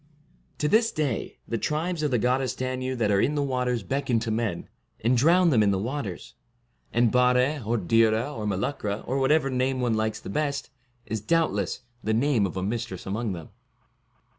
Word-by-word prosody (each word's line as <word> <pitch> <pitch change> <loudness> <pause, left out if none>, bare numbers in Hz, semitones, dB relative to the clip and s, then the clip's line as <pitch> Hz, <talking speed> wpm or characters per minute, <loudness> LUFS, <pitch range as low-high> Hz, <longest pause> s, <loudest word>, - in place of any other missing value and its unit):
To 150 - 0
this 225 +7 +3
day 145 -7 -2
the 115 - -2
Tribes 160 - -1
of 150 - +1
the 125 - +2
Goddess 125 +3 +1
Danu 130 0 -2
that 110 -4 +1
are 100 -1 +3
in 150 - +1
the 145 - +1
waters 125 -4 -1
beckon 130 +3 0
to 115 -1 -2
men, 110 -6 -2 0.3
and 120 +3 +3
drown 170 +7 +4
them 115 -6 +4
in 105 - +4
the 100 - +2
waters; 115 -1 -4 0.6
and 120 -1 +3
Bare, 125 +3 +3
or 115 +3 0
Dhira, 115 +6 +2
or 105 -2 -3
Meluchra, 105 +1 -2
or 135 +2 -1
whatever 135 0 +3
name 130 +1 0
one 120 -2 +1
likes 110 0 -1
the - - -10
best, 145 -2 -2 0.3
is, 110 -1 -3
doubt 165 +6 +2
less, 100 +3 -2 0.2
the 110 0 +1
name 120 -4 +2
of 95 - -7
a 95 - -2
mistress 115 -2 -3
among 105 +2 -2
them. 85 -3 -8
125 Hz, 190 wpm, -26 LUFS, 110-140 Hz, 0.6 s, drown